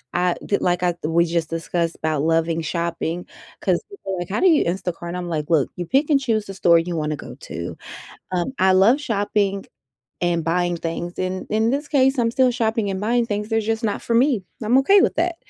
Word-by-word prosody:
I 180 0 +2
d 200 - +1
like, 180 0 0
I 175 -1 +2
we 165 +2 +2
just 165 -1 -1
discussed 165 0 -2
about 155 -2 -1
loving 165 +1 +1
shopping 170 +1 -3 0.4
'cause - - +1
people 300 - -7
are, - - -5
like, 175 0 -5
"How 205 - -1
do 380 - +4
you 315 -4 +4
Instacart? 175 -1 -3
And 180 - -4
I'm, 180 -1 -4
like, 150 -2 -3
"Look, 155 -6 +2
you 175 - -4
pick 285 - +2
and 285 - +4
choose 225 -6 0
the 195 - -7
store 170 -3 +4
you 170 0 -3
wanna 150 -1 -1
go 125 -4 -10
to. 85 +2 -6 0.5
Um, 180 +7 -1
I 190 0 +4
love 205 +9 +5
shopping 205 -4 -1 0.6
and 175 -1 +1
buying 175 +1 0
things, 170 +1 -5
and 185 0 -3
in 220 +2 +2
this 285 +3 -2
case, 270 -2 +3
I'm 230 -1 +2
still 255 +1 +3
shopping 225 -3 0
and 190 0 -3
buying 235 +2 +1
things. 210 -1 -3
They're 225 0 +1
just 225 +1 -2
not 205 - -1
for 230 - -1
me. 245 -3 +3 0.2
I'm 235 +4 +4
okay 390 +9 +5
with - - +1
that." 340 +1 0
185 Hz, 225 wpm, -22 LUFS, 170-230 Hz, 0.6 s, love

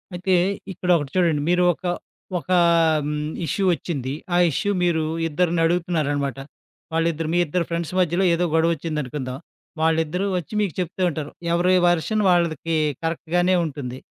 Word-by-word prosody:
అయితే 185 +2 0 0.4
ఇక్కడ 180 +1 -5
ఒకటి 145 -3 -5
చూడండి. 170 -5 +2
మీరు 180 0 +3
ఒక 185 - -14 0.5
ఒకా 180 +3 0 0.5
హ్మ్. 150 0 -2 0.2
ఇష్యూ 195 +6 -1
వచ్చింది 135 -4 -4 0.2
ఆ - - +4
ఇష్యూ 205 +8 -1
మీరు 165 -3 +2 0.2
ఇద్దరినడుగుతున్నారనమాట, 165 -4 0 0.6
వాళిద్దరు 165 -1 0
మీ 175 - +3
ఇద్దరు 170 +2 -1
ఫ్రెండ్స్ 170 0 -3
మధ్యలో 180 +2 +2
ఏదో 175 +1 +1
గొడవోచ్చిందనుకుందాం, 150 -5 -1 0.4
వాళ్ళిద్దరూ 160 +3 +1
వచ్చి 175 +4 -6
మీకు 195 -6 -1
చెప్తూ 180 +1 -3
ఉంటారు 150 -2 -5 0.2
ఎవరి 180 +2 +3
వెర్షన్ 175 +5 +1
వాళ్ళకి 165 -2 +1 0.3
కరెక్ట్‌గానే 175 +3 +1
ఉంటుంది. 135 -4 -6
165 Hz, 130 wpm, -23 LUFS, 150-175 Hz, 0.6 s, ఆ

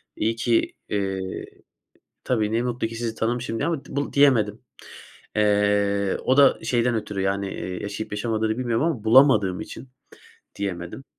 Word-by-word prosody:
İyi 115 +1 0
ki, 115 0 +1 0.2
eee, 95 -2 -3 0.8
tabii, 110 -4 0
ne 115 +2 +1
mutlu 120 -2 -2
ki 115 - -8
sizi 115 -1 -3
tanımışım." 115 0 -2
diye 145 - -1
ama 160 -5 -2
bul 140 +1 -3
diyemedim. 115 -7 +3 0.8
Eee, 100 -1 +2
o 130 - +3
da 140 -1 +6
şeyden 120 -1 +1
ötürü, 105 -3 -3
yani, 100 0 -1
eee, 90 -1 -5
yaşayıp 100 +1 -5
yaşamadığını 110 +1 -1
bilmiyorum 120 +2 0
ama 130 -10 -2
bulamadığım 115 -6 +5
için 135 - -9 0.7
diyemedim. 95 +5 -5
110 Hz, 145 wpm, -24 LUFS, 100-125 Hz, 0.8 s, da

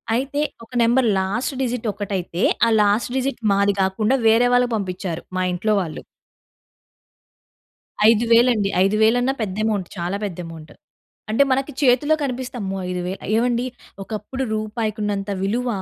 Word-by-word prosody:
అయితే 275 +4 -1 0.2
ఒక 230 - -22
number 240 +2 +3
last 205 +9 -2
digit 245 -2 -2
ఒకటైతే 195 -4 -4 0.3
ఆ - - +3
లాస్ట్ 210 +4 +1
డిజిట్ 270 +1 -2
మాది 200 0 +2
కాకుండా 210 +6 +1
వేరే 225 +2 +5
వాళ్ళకి 245 -1 +3
పంపించారు. 185 -3 -4 0.2
మా 185 - +1
ఇంట్లో 215 +5 0
వాళ్ళు. 165 -4 -6 2.1
ఐదు 230 +1 +3
వేలండి. 230 -4 +4 0.2
ఐదు 195 +2 +1
వేలన్నా 245 +4 +3
పెద్ద 195 -4 -3
అమౌంట్. 205 -5 -1
చాలా 175 +3 -2
పెద్ద 190 -5 -6
అమౌంట్. 160 -2 -11 0.6
అంటే 230 +6 +4
మనకి 270 +2 0
చేతిలో 280 +4 +4
కనిపిస్తే, 255 -2 -4
అమ్మో! 195 -1 -3
5,000 180 +1 -4
ఏవండీ! 240 +1 +1 0.4
ఒకప్పుడు 220 +6 -5
రూపాయికి 215 0 -3
ఉన్నంత 205 -1 -2
విలువ 235 +6 -1
215 Hz, 140 wpm, -21 LUFS, 195-245 Hz, 2.1 s, వేరే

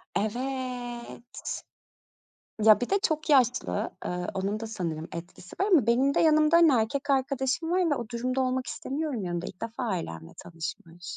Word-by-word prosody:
Evet. 245 +1 -3 1.4
Ya, 215 +1 +7
bir 245 - -2
de 400 - +4
çok 310 -1 0
yaşlı, 255 -3 +2 0.2
ııı, 180 0 -3
onun 200 +3 -2
da 225 - -4
sanırım 170 -7 -4
etkisi 175 +2 -9
var. 390 - +3
Ama 275 -10 +5
benim 260 +4 +3
de - - +3
yanımda, 310 0 +5
hani, 330 -4 +6
erkek 270 +5 0
arkadaşım 270 +4 0
var 360 -2 +2
ve - - +3
o 240 -4 -5
durumda 255 +2 -1
olmak 255 0 0
istemiyorum 280 -5 -3
yanında, 175 0 -3
ilk 180 - -10
defa 230 +3 -4
ailemle 85 - -4
tanışmış. 165 +1 -7
245 Hz, 160 wpm, -28 LUFS, 200-275 Hz, 1.4 s, Ya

